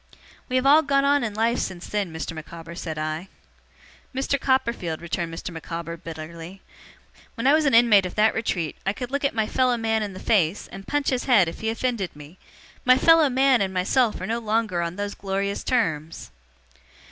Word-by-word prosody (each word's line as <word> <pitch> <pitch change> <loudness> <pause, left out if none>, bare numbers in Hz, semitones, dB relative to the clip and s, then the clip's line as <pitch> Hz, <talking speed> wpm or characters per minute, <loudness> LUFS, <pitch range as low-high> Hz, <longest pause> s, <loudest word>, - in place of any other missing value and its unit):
'We 255 - -2
have 255 +1 +2
all 295 +3 +7
got 275 -3 +2
on 285 0 +3
in 215 -3 -3
life 230 +2 +1
since 180 -1 -4
then, 205 -4 -2
Mr. 160 0 -5
Micawber,' 165 +1 -9
said 165 -2 -6
I. 155 +4 -3 0.9
'Mr. 270 +1 -1
Copperfield,' 235 - 0
returned 170 0 -3
Mr. 165 +2 -6
Micawber, 165 0 -6
bitterly, 165 +3 -9 0.7
'when 230 -1 -4
I 275 - +6
was 310 0 +3
an 275 -4 +3
inmate 215 -5 +6
of - - -10
that 215 +1 +3
retreat 180 -8 -2
I 195 - 0
could 245 +2 -6
look 280 0 0
my 220 -1 0
fellow 250 +2 +1
man 225 -1 0
in 205 -2 -4
the 185 - -9
face, 190 -4 +1
and 195 0 -10
punch 290 -1 0
his 255 -2 -1
head 215 -10 +5
if 165 - -6
he 220 - -2
offended 225 -6 -2
me. 150 +5 -13 0.4
My 255 0 +5
fellow 325 +1 +5
man 260 -2 +3
and 190 -1 0
myself 220 +6 +1
are - - -4
no 230 +2 -1
longer 215 -5 0
on 170 0 -3
those 205 0 -4
glorious 200 0 -3
terms! 165 - -1
210 Hz, 195 wpm, -24 LUFS, 170-250 Hz, 0.9 s, all